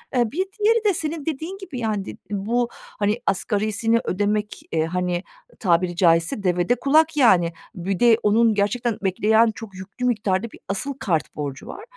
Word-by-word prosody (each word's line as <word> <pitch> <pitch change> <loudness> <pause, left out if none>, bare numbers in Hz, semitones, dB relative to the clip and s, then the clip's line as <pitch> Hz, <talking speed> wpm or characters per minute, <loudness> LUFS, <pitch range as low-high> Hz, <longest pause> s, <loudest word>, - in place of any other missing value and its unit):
Eee, 240 -3 +2
bir 370 +4 -1
diğeri 445 +1 +3
de 405 - +4
senin 315 -2 -4
dediğin 320 +5 -4
gibi, 360 -10 -7
yani, 215 -4 -1
did - - -8
bu, 230 +5 0
hani, 210 +3 -3
asgarisini 215 +3 +1
ödemek, 210 +2 -1
eee, 160 -1 +1
hani, 180 +1 -2 0.4
tabiri 175 -2 +1
caizse 165 +2 +2
devede 180 +5 +2
kulak, 310 +5 +3
yani. 175 - +4 0.2
Bir 185 +1 -3
de 235 -2 +6
onun 220 +2 +4
gerçekten 210 +3 0
bekleyen 220 +4 +3
çok 215 -4 -10
yüklü 195 +7 -6
miktarda 215 -2 0
bir - - -14
asıl 200 +9 -2
kart 165 -6 -1
borcu 140 -3 -5
var 420 - -8
210 Hz, 165 wpm, -23 LUFS, 185-245 Hz, 0.4 s, de